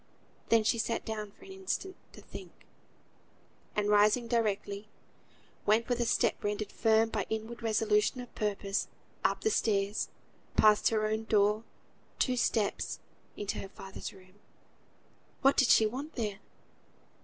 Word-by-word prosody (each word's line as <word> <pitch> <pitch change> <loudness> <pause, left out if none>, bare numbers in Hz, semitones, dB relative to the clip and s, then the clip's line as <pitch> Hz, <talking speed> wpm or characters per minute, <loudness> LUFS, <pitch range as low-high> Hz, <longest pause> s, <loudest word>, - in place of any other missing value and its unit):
Then 225 -1 +5
she 230 +2 +2
sat 230 +1 -1
down 215 -2 -4
for 200 - -18
an 390 - -11
instant 385 0 -3 0.2
to - - -12
think; - - -11 1.1
and 210 -1 +1
rising 210 +3 +4
directly, 210 -3 -1 0.8
went, 220 +2 +4
with 245 -1 +1
a 240 - +2
step - - +1
rendered 205 0 -2
firm 225 0 +3
by 215 -3 -2
inward 220 +2 -4
resolution 220 +1 +2
of 245 -1 -9
purpose, 200 -1 -1 0.4
up - - +1
the 440 - +2
stairs; 205 - +1 0.5
passed 215 -1 +6
her 215 -1 +1
own 220 +1 -1
door, 210 0 +2 0.5
two 255 - +2
steps, 225 -3 0 0.4
into 205 - -3
her 195 - -7
father's 195 0 -8
room. 185 +1 -18 1.0
What 275 +1 +6
did 265 - +4
she 220 - +6
want 270 +8 -4
there? 210 -5 -2
215 Hz, 145 wpm, -31 LUFS, 205-230 Hz, 1.1 s, passed